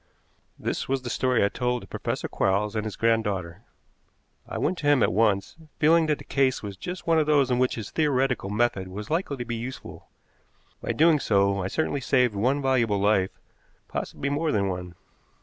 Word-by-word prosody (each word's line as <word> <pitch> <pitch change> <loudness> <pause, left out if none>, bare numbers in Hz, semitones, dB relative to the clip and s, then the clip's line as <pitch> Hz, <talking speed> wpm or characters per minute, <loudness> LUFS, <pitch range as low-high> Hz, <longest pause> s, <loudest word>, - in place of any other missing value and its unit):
This - - -3
was 135 -1 0
the 120 - -4
story 125 -4 +2
I - - +1
told 125 +1 -2
to - - -12
Professor - - -3
Quarles 100 +2 0
and 110 0 -1
his 105 -3 -4
granddaughter. 105 -6 0 0.9
I - - -4
went 185 - -1
to 145 - -2
him 145 -4 +5
at - - +2
once, 105 - +1 0.2
feeling 160 +1 +4
that 150 -1 +1
the - - -11
case 135 -4 +1
was 100 -1 -6
just 180 - -7
one 165 -1 +3
of 150 - +1
those 140 -4 +3
in 125 - +2
which 130 0 +1
his 110 -4 -6
theoretical 135 -8 +1
method 105 -3 0
was 105 +8 -7
likely 160 -4 -1
to 120 - -5
be 120 0 -3
useful. 120 +3 -8 0.7
By - - -2
doing 160 -1 +4
so 100 -4 +2
I 90 - -2
certainly 145 +4 -1
saved 125 -3 +2
one 130 +8 0
valuable 120 -6 +2
life, 100 -2 +1 0.5
possibly 140 - -4
more 155 +2 0
than 100 -4 +1
one. 90 -1 -5
120 Hz, 195 wpm, -26 LUFS, 100-140 Hz, 0.9 s, him